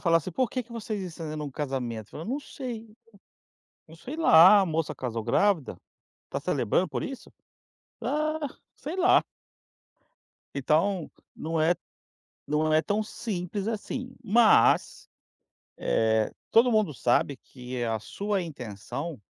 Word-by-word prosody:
falar 165 -2 +4
assim, 165 +3 -2
por 255 +4 +1
que 255 - -2
que 235 - -16
vocês 215 -3 -4
estão 165 -2 -6
encenando 150 0 -4
um 145 - -5
casamento? 125 -6 -3
Você - - -27
fala, 160 - -7
eu - - -7
não 280 +4 -1
sei? 230 -6 -7 0.9
Eu 160 - -14
sei 270 - -7
lá, 200 - +8
a 190 - +1
moça 160 -1 -1
casou 115 -3 -3
grávida, 160 - +1 0.5
está - - -4
celebrando 180 - +1
por 130 -5 -3
isso? 270 - -7 0.7
Ah, 310 +1 0 0.4
sei 315 +6 -6
lá? 370 0 +5 1.3
Então, 160 +6 +1 0.2
não 160 0 -2
é 165 +3 +4 0.7
não 155 +1 +1
é 155 - +5
tão 210 +3 0
simples 205 -2 -4
assim, 250 +4 -4
mas, 225 0 +4 0.7
eh, 110 - +1 0.2
todo 240 +2 +6
mundo 215 - +2
sabe 125 +3 +1
que 125 -1 -10
é 120 -1 -1
a 110 -1 0
sua 200 - -2
intenção 130 - -6
170 Hz, 145 wpm, -27 LUFS, 140-220 Hz, 1.3 s, lá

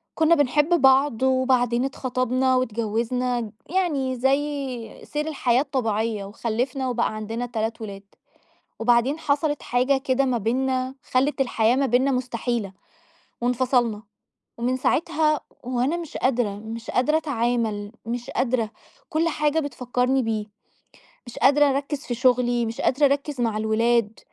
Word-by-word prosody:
كنا 320 +1 +4
بنحب 295 +4 +2
بعض، 265 -2 +4
وبَعدين 255 -2 +2
اتخطبنا 255 0 0
واتجوزنا، 235 0 -1 0.2
يعني 295 -8 0
زي 270 -2 -2
سير 300 +1 -3
الحياة 260 -5 +2
الطبيعية، 225 -6 -1
وخلفنا، 245 +5 -2
وبقى 240 -2 0
عندنا 225 +3 -4
3 225 -1 -3
ولاد. 200 -2 -7 0.8
وبعدين 240 +6 +2
حصلت 295 -1 0
حاجة 255 +3 +2
كدا 265 0 +1
مَا 255 -2 +1
بيننا، 255 +3 -1
خَلت 270 +3 0
الحياة 235 -1 +2
ما 275 0 +2
بيننا 255 +3 +2
مُستحيلة، 240 -5 -2 0.7
وانفصلنا. 245 -3 +1 0.6
ومن 250 +2 0
ساعتها 305 +2 +1 0.2
وأنا 255 +5 0
مش 335 -3 -7
قادرة، 240 -6 0
مش 225 +2 -7
قادرة 295 +5 +2
أتعامل، 235 -8 -1
مش 240 +1 -4
قادرة. 235 -4 0 0.4
كل 330 +1 +1
حاجة 300 -1 0
بتفكرني 250 -1 0
بيه. 220 -2 -2 0.8
مش 240 - -11
قادرة 290 +2 +5
أركز 280 +1 -1
في 245 - -3
شُغلي، 245 -1 +2
مش 225 0 -4
قادرة 280 +3 +3
أركز 280 -1 0
مع 225 -3 0
الولاد. 220 0 +1
250 Hz, 130 wpm, -24 LUFS, 230-275 Hz, 0.8 s, قادرة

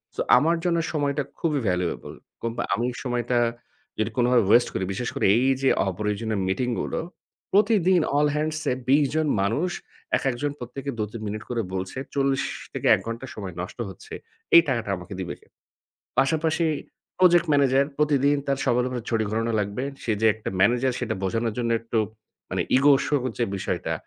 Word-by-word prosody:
So - - -1 0.2
আমার 165 +2 +3
জন্য 170 -1 +2 0.2
সময়টা 145 -1 0 0.2
খুবই 150 -4 0
ভ্যালুয়েবল। 90 -1 -2 0.3
কোম্পা 115 +1 -2
আমি 115 +4 0 0.2
সময়টা 120 -1 0 0.6
যদি 110 +1 +1
কোনভাবে 125 -1 +4
ওয়েস্ট 120 +2 +5
করি, 95 - -2
বিশেষ 120 +5 -3
করে - - 0
এইযে 135 +2 +2 0.2
অপ্রয়োজনীয় 105 +3 -2
মিটিংগুলো, 120 +5 -1 0.5
প্রতিদিন 190 -4 +4 0.2
all 150 - +4
hands 155 +1 -1
এ - - +2 0.2
২০ 145 +2 +5
জন 155 -1 +2
মানুষ, 115 - 0 0.5
একেকজন 135 +2 -1
প্রত্যেকে 130 +3 -6
২-৩ 105 +1 -4
মিনিট 105 +1 -4
করে 120 -2 -1
বলছে, 95 +5 -4 0.2
৪০ 135 -1 +1 0.3
থেকে - - -2
১ - - -5
ঘণ্টা 115 +3 -4
সময় 95 -4 -6
নষ্ট 90 +6 -8
হচ্ছে। 95 - -12 0.4
এই 170 - +11
টাকাটা 115 -5 -1
আমাকে 90 +2 -9
দিবে 90 -2 -4
কে? - - -25 0.7
পাশাপাশি 160 +4 +1 0.5
প্রজেক্ট 175 -2 +5
ম্যানেজার, 140 -1 +4
প্রতিদিন 145 -1 +3
তার 140 -1 +1
সবার 125 -1 +2
উপরে 125 -2 -4
ছড়ি 115 -2 +1
ঘোরানো 115 +2 -1
লাগবে। 105 +5 -2 0.2
সে 115 - 0
যে 110 - +5
একটা 110 - -5
ম্যানেজার, 125 +5 +3
সেটা 120 - -2
বোঝানোর 115 +3 -1
জন্য 120 -1 -1
একটু 115 0 -1 0.5
মানে - - 0 0.2
ইগো 140 +1 +6
শো 145 - +1
হচ্ছে 125 -1 -4
যে - - -7
বিষয়টা, 90 -2 -2
125 Hz, 165 wpm, -25 LUFS, 110-145 Hz, 0.7 s, এই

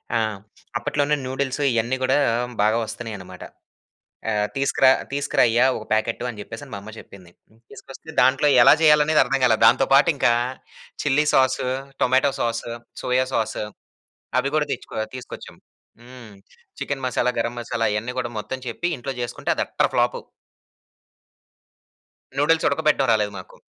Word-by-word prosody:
ఆ! - - +3 0.6
అప్పట్లోనే 145 +4 0
నూడిల్స్ 130 +2 -3
ఇయన్ని 115 +2 0
గూడా 130 +1 +2 0.4
బాగా 110 +2 +3
వస్తున్నాయనమాట. 105 -5 -8 0.9
ఆహ్, 105 -1 0
తీసుకురా 135 -1 +3 0.2
తీసుకురాయ్యా! 125 -3 +2
ఒక 110 - -9
ప్యాకెట్టు 110 +2 0
అని 110 -4 -8
చెప్పేసని 115 +6 -10
మా - - -4
అమ్మ 110 +2 -10
చెప్పింది. 90 -3 -15 0.4
తీసుకొస్తే 135 +4 -13
దాంట్లో 135 +3 +3
ఎలా 135 - +8
చేయాలనేది 150 0 +5
అర్థం 135 - -1
కాల. 120 -3 +5
దాంతో 130 +2 +5
పాటు 140 +4 +6
ఇంకా 120 -3 +3 0.7
చిల్లి 145 +2 +2
sauce, 130 -1 +2 0.3
tomato 130 +2 +3
sauce, 115 0 -2 0.3
soya 125 +1 +1
sauce 110 - -1 0.8
అవి 135 +2 -2
గూడా 150 -1 +1
తెచ్చుకో - - -9 0.2
తీసుకొచ్చాం. 125 - -10 0.4
హ్మ్. 120 -3 -13 0.5
చికెన్ 140 -2 -4
మసాలా, 125 0 0
గరం 120 +1 -2
మసాలా 115 -1 -1
అయన్ని 110 +4 -3
గూడా 120 -1 -3
మొత్తం 105 +5 -5
చెప్పి 120 +9 -3
ఇంట్లో 135 +2 -5
చేసుకుంటే 120 - -5
అది - - 0
అట్టర్ - - 0
ఫ్లాపు. - - +1 2.2
నూడిల్స్ 160 +3 +2
ఉడకబెట్టడం 150 +1 +1
రాలేదు 105 -2 0
మాకు. 95 - -12
125 Hz, 135 wpm, -22 LUFS, 115-140 Hz, 2.2 s, ఎలా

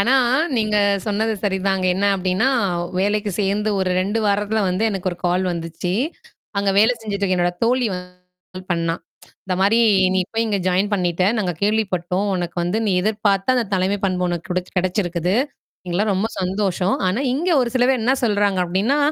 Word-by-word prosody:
ஆனா, 240 +6 +3 0.4
நீங்க 215 -1 +1 0.3
சொன்னது 220 +2 0
சரிதாங்க. 190 -1 0
என்ன 200 +2 +1
அப்படீன்னா, 190 +6 +1 0.5
வேலைக்கு 205 +1 0
சேர்ந்து 205 +2 0
ஒரு 185 -1 0
2 200 +4 -1
வாரத்துல 205 +2 +1
வந்து 185 +3 -1
எனக்கு 190 -2 -2
ஒரு 175 - -10
கால் 180 +2 +1
வந்துச்சு. 170 +1 -4 0.7
அங்க 200 0 +1
வேல 220 +4 +5
செஞ்சுட்டுருக்க 200 -3 -1
என்னோட 175 0 +1
தோழி 250 +1 +2
வந்து 180 0 -8 0.4
கால் 185 0 -10
பண்ணா. 165 -1 0 0.5
இந்த 185 - -1
மாரி, 205 +4 +4 0.4
நீ 190 - +2
போய் 225 0 0
இங்க 205 -2 0
ஜாயின் 195 +3 +1
பண்ணிட்டே. 180 0 +1
நாங்க 185 -4 0
கேள்விப்பட்டோம். 195 -3 0
உனக்கு 175 -1 -4
வந்து, 180 +5 0
நீ 200 - +2
எதிர்பார்த்த 205 +2 +1
அந்தத் 230 -5 -1
தலைமைப் 190 +2 0
பண்பு 180 -1 0
உனக்கு 175 +2 -4
குடச்சு 180 0 -3
கெடைச்சிருக்குது. 180 -1 -1 0.5
எங்களுக்கல்லாம் 200 +4 0
ரொம்ப 200 +4 0
சந்தோஷம். 190 0 0
ஆனா, 205 +8 -1
இங்க 345 +6 -1
ஒரு 240 - -1
சில 250 - +2
பேர் 260 -2 +2
என்னா 255 +3 +3
சொல்றாங்க 205 -3 +1
அப்படீன்னா, 195 +11 +1
195 Hz, 170 wpm, -21 LUFS, 180-210 Hz, 0.7 s, வேல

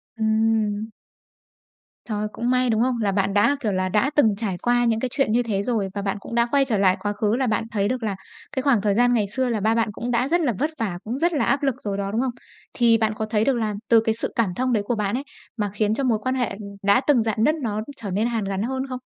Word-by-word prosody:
Ừm. 220 -1 +1 1.2
Trời! 210 -2 -2
Cũng 240 +1 -2
may, 255 0 +2
đúng 220 -1 +2
không? 255 +1 +2
Là 200 -2 +1
bạn 195 0 0
đã, 210 +8 +4
kiểu 225 -6 -1
là, 185 -1 0
đã 215 +7 +2
từng 220 -9 +4
trải 200 -5 -3
qua 240 +4 +2
những 225 -1 +1
cái 255 - -2
chuyện 275 -5 +1
như 240 +2 +2
thế 205 -4 -1
rồi, 210 -4 -1
và 200 - -3
bạn 195 +1 -2
cũng 230 - -7
đã 235 0 +3
quay 280 -1 +3
trở 230 -5 0
lại 190 -1 +3
quá 205 0 -2
khứ 210 +2 0
là 260 0 0
bạn 220 -1 0
thấy 205 -2 0
được 250 0 -2
là 205 -3 -1 0.4
cái 260 - -2
khoảng 270 -7 +3
thời 205 0 +1
gian 245 +2 +4
ngày 220 -4 +2
xưa 255 +5 -1
là 225 - 0
ba 220 +2 +2
bạn 230 -1 +1
cũng 240 +4 -4
đã 245 +2 +1
rất 345 +4 +2
là 265 -7 +1
vất 300 - +1
vả, 200 -6 -2
cũng 240 +5 -4
rất 340 +2 +2
là 295 - +1
áp 280 +1 +1
lực 270 -3 +1
rồi 200 -2 -3
đó, 200 0 -2
đúng 225 - 0
không? 260 -1 0 0.4
Thì 235 -2 +4
bạn 220 -1 +1
có 220 - -2
thấy 215 -1 0
được 270 - +2
là 215 -2 -1 0.2
từ 230 -1 +7
cái 225 0 0
sự 230 - -4
cảm 215 -6 +1
thông 255 +2 0
đấy 210 - +1
của 240 - 0
bạn 210 0 -1
ấy, 275 - -4 0.3
mà 205 -2 -1
khiến 210 +1 +1
cho 275 - -2
mối 235 -4 +2
quan 255 +2 -1
hệ, 245 -3 0
ừm, 195 - -8 0.2
đã 200 +4 +4
từng 255 -7 +4
rạn 220 0 0
nứt 305 +6 +3
nó, 235 -10 -3
ưm, 215 - -2 0.2
trở 205 - -4
nên 210 +5 +1
hàn 230 -3 -1
gắn 195 0 -2
hơn 265 +3 -2
không? 255 -1 -4
225 Hz, 290 wpm, -23 LUFS, 210-250 Hz, 1.2 s, từ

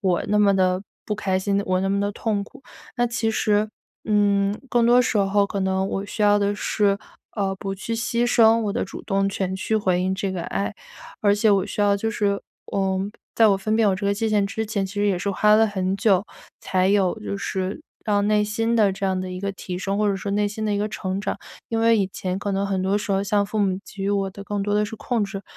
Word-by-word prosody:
我 180 -3 +1
那 210 - +2
么 200 -1 +4
地 185 -1 +2 0.2
不 210 - -2
开 190 -3 0
心、 200 +1 0
我 185 0 +1
那 195 - 0
么 200 +1 +1
地 205 0 -1
痛 205 -2 -1
苦。” 270 - -17 0.3
那 240 - +2
其 230 -1 -1
实， 215 -1 +1 0.4
嗯， 205 -1 +2
更 235 -1 +3
多 245 +1 +6
时 230 - 0
候 200 +1 +3
可 200 - -4
能 190 0 0
我 195 +1 -3
需 210 - -3
要 205 0 +5
的 205 0 +1
是， 205 -1 +1 0.4
呃， 195 -3 -1
不 195 0 -4
去 195 +4 -5
牺 230 +2 0
牲 230 -1 +5
我 205 -2 -1
的 240 - -1
主 - - -9
动 195 0 0
权 190 -1 -2
去 220 +3 0
回 185 -4 +1
应 190 +1 0
这 190 0 -2
个 180 -2 -3
爱。 200 +4 -2 0.5
而 205 -1 +4
且 210 +1 +3
我 195 -2 +3
需 - - -4
要 205 -1 +4
就 225 +3 -2
是 200 -2 0 0.3
嗯， 195 0 0 0.2
在 225 -2 +5
我 195 - +4
分 215 +3 -1
辨 225 -2 +4
我 190 - +1
这 200 - -3
个 200 - +2
界 220 +2 -1
限 205 -2 +2
之 220 +3 -3
前， 200 -3 -1
其 190 - -10
实 205 0 +1
也 185 - +1
是 200 - -3
花 210 +2 +4
了 220 +1 +5
很 190 -2 -1
久， 200 -2 +3 0.4
才 185 0 +1
有 195 -2 +2
就 100 -1 -4
是 190 - -3 0.2
让 205 -1 +1
内 210 0 +3
心 225 +2 0
的 210 -3 +4
这 195 +1 -5
样 185 -1 0
的 185 - -4
一 185 0 -6
个 200 0 -2
提 185 -2 -6
升， 195 +2 -2
或 210 -1 +2
者 200 - +1
说 200 +1 -4
内 205 0 +2
心 215 +1 -5
的 210 - 0
一 - - 0
个 210 +1 -1
成 190 -1 -3
长。 - - -2 0.3
因 225 -1 -1
为 230 0 +5
以 195 - +2
前 185 0 -3
可 200 0 -3
能 195 +1 0
很 195 -1 -1
多 195 +2 +1
时 205 - -5
候， 195 - +2
像 205 0 +1
父 215 +1 -3
母 195 -2 +2
给 195 - -8
予 200 - 0
我 195 -1 0
的 200 +1 -10
更 205 0 -2
多 205 +1 -1
的 210 0 +2
是 220 - -6
控 230 -2 -1
制， 195 0 -6
200 Hz, 280 characters per minute, -23 LUFS, 195-210 Hz, 0.5 s, 多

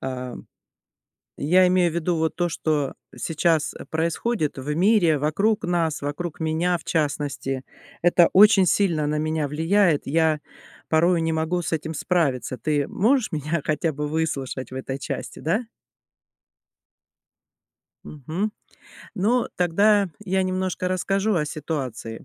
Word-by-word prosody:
А-а, 130 -1 -5 1.0
я 180 +5 +4
имею 180 -1 +3
в - - -7
виду 170 +1 0
вот 160 0 0
то, 175 0 0
что 155 -4 -1 0.2
сейчас 160 -1 0
происходит 165 +2 -1
в 140 +3 -3
мире, 175 -2 +3
вокруг 200 +10 +1
нас, 170 -3 0
вокруг 145 +3 -4
меня 165 +2 0
в - - -15
частности, 140 -3 -2 0.4
это 175 0 +5
очень 200 -1 +7
сильно 170 -5 +2
на 150 - -1
меня 155 -1 -1
влияет, 165 +2 +2
я 160 +1 +2 0.5
порою 170 +2 +3
не 165 0 0
могу 160 +3 -1
с 165 - -3
этим 160 0 -3
справиться. 145 -7 0
Ты 145 -1 0
можешь 245 +3 +1
меня 155 +1 -2
хотя 155 +2 0
бы 150 +1 -3
выслушать 145 -5 -3
в 130 - -7
этой 130 +1 -5
части, - - -5
да? 210 +9 -1 2.4
Мгм. 160 +9 -4 0.6
Ну, 225 +5 +1
тогда 200 +3 +3 0.2
я 190 -1 +1
немножко 185 0 -2
расскажу 195 +3 0
о 160 -4 +1
ситуации. 135 -8 -5
160 Hz, 130 wpm, -24 LUFS, 150-185 Hz, 2.4 s, очень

